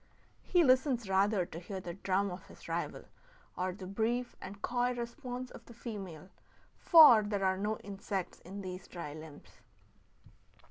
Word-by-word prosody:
He 355 -2 +3
listens 255 -4 +3
rather 195 0 +2
to 165 - -8
hear 190 +2 -6
the 175 -2 -6
drum 195 +1 0
of 180 - -9
his - - -14
rival - - -3 0.5
or 185 +1 -1
the 185 +1 -9
brief 230 +5 -1
and 195 +1 -8
coy 245 +2 0
response 245 +1 -5
of - - -11
the 235 - -13
female; 195 -8 -7 0.5
for 305 -10 +9
there 205 -2 -1
are 190 0 +3
no 210 +2 -1
insects 195 -1 -4
in 195 +4 -8
these 185 -1 -7
dry 170 -5 -7
limbs. 155 -1 -12
200 Hz, 155 wpm, -33 LUFS, 185-240 Hz, 0.5 s, for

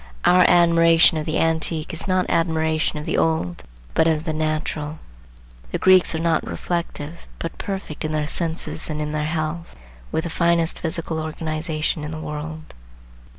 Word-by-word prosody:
Our 180 0 +6
admiration 165 -2 +5
of 155 - -5
the 155 - 0
antique 160 -1 0
is 165 - -3
not 185 -1 +2
admiration 160 -2 +1
of 150 - -5
the - - 0
old, 160 - 0 0.3
but 160 - +3
of 160 -1 +1
the 160 -2 -2
natural. 155 0 -2 0.7
The - - -2
Greeks 185 -3 +5
are - - -1
not 165 -1 +1
reflective, 170 -2 -4
but 165 - -6
perfect 190 -6 -5
in 155 - -2
their 155 -1 0
senses 160 0 -3
and 150 -1 -3
in 150 0 -2
their 150 0 -1
health, 160 +1 -3 0.4
with 160 - 0
the 170 - -4
finest 170 -1 +1
physical 160 -1 -3
organization 155 0 -2
in 150 - -4
the 155 0 -6
world. 155 0 -6
160 Hz, 165 wpm, -22 LUFS, 155-165 Hz, 0.7 s, Our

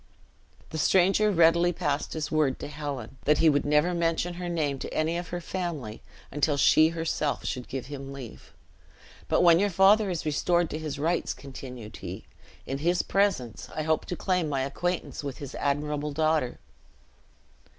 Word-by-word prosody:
The 160 - -3
stranger 195 +6 +4
readily 170 -1 +4
passed 145 -3 -2
his 155 -2 -3
word 150 -4 +2
to - - -6
Helen 140 -5 -6
that 150 0 +4
he 160 - +5
would 145 - +1
never 150 +4 +3
mention 170 +1 0
her 175 0 -5
name 150 -5 -1
to - - -6
any 160 +2 0
of 175 +1 -3
her 175 - -4
family 165 - -5 0.3
until 145 +1 +1
she 155 +2 +5
herself 165 -3 -2
should 125 -2 -3
give 135 -2 -5
him 135 -1 -7
leave. 135 -5 -10 0.8
"But - - +2
when 170 -1 +7
your 205 +1 +2
father 195 +3 +5
is 170 -4 -3
restored 170 +3 +1
to 155 - -3
his 155 -3 -4
rights," 165 +4 0
continued 125 -5 -9
he, - - -7 0.4
"in 135 +1 -3
his 175 +4 +1
presence 195 - 0
I 155 - -1
hope 160 0 0
to 180 - -3
claim 180 -3 0
my 135 -2 0
acquaintance 175 +4 -3
with 140 -3 -5
his 140 -2 -8
admirable 150 +1 -1
daughter." 155 -4 +1
155 Hz, 170 wpm, -27 LUFS, 140-175 Hz, 0.8 s, when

